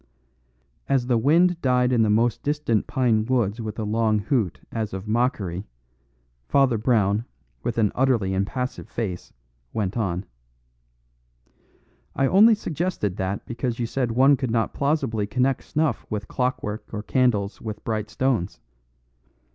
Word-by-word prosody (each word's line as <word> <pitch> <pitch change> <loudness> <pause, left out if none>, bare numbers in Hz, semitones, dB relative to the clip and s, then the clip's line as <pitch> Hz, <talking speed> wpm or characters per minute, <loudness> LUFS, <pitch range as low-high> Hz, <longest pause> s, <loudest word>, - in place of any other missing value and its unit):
As 135 -3 +2
the 125 -2 +2
wind 170 +7 +3
died 125 -1 +2
in 120 - +3
the 110 - +3
most 115 +2 +2
distant 145 -7 0
pine 115 -4 +2
woods 115 -2 0
with 110 -1 -5
a 110 - -2
long 110 0 +1
hoot 105 - 0
as 110 -3 -3
of 95 +2 -7
mockery 105 -6 -1 0.8
Father 135 -5 +3
Brown, 110 -2 +2 0.4
with 120 -1 -3
an 105 -3 +3
utterly 120 -8 +1
impassive 125 +7 -3
face, 95 -7 -4 0.4
went 100 -2 -2
on: 95 -4 -1 1.9
"I 135 - +2
only 210 - +6
suggested 165 - -2
that 95 +1 -3
because 120 0 -3
you 120 - -1
said 120 0 -1
one 135 +3 +5
could 130 -2 -2
not 115 0 0
plausibly 140 -8 0
connect 125 +6 0
snuff 155 0 -1
with 105 -1 -4
clockwork 125 -4 -3
or 105 -1 -4
candles 115 -6 +1
with 110 -2 -6
bright 110 -2 -2
stones. 110 - -1
115 Hz, 140 wpm, -24 LUFS, 105-130 Hz, 1.9 s, only